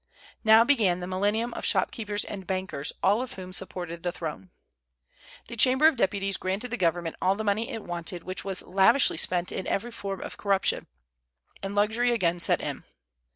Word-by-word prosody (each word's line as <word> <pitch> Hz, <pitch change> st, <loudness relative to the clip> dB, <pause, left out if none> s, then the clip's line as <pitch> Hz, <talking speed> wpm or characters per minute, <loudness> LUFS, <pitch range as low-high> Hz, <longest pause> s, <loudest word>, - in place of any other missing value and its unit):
Now 220 Hz, 0 st, +7 dB
began 220 Hz, -9 st, +2 dB
the 180 Hz, -, -5 dB
millennium 205 Hz, +6 st, -1 dB
of -, -, -7 dB
shopkeepers 205 Hz, +1 st, +1 dB
and 195 Hz, -3 st, -8 dB
bankers, 185 Hz, -7 st, -1 dB
all 205 Hz, +5 st, +3 dB
of 255 Hz, -, -5 dB
whom 185 Hz, -1 st, -8 dB
supported 175 Hz, -3 st, 0 dB
the 175 Hz, -, -2 dB
throne. 150 Hz, -, -7 dB, 1.0 s
The 235 Hz, -, -7 dB
Chamber 260 Hz, +5 st, +4 dB
of 320 Hz, -, +3 dB
Deputies 195 Hz, -3 st, 0 dB
granted 195 Hz, +6 st, -3 dB
the -, -, -1 dB
government 170 Hz, -2 st, -1 dB
all 190 Hz, +1 st, +2 dB
the 220 Hz, -, -4 dB
money 215 Hz, +2 st, 0 dB
it 225 Hz, -, -6 dB
wanted, 175 Hz, 0 st, -4 dB
which 185 Hz, +1 st, -3 dB
was 195 Hz, -2 st, -3 dB
lavishly 195 Hz, +8 st, +4 dB
spent 180 Hz, -1 st, +1 dB
in 190 Hz, -, -4 dB
every 240 Hz, +4 st, -2 dB
form 195 Hz, -4 st, -6 dB
of -, -, -8 dB
corruption, 195 Hz, -2 st, 0 dB, 0.7 s
and 195 Hz, +1 st, -5 dB
luxury 220 Hz, +4 st, +2 dB
again 175 Hz, -7 st, +1 dB
set -, -, +3 dB
in. -, -, -5 dB
195 Hz, 180 wpm, -27 LUFS, 180-225 Hz, 1.0 s, Now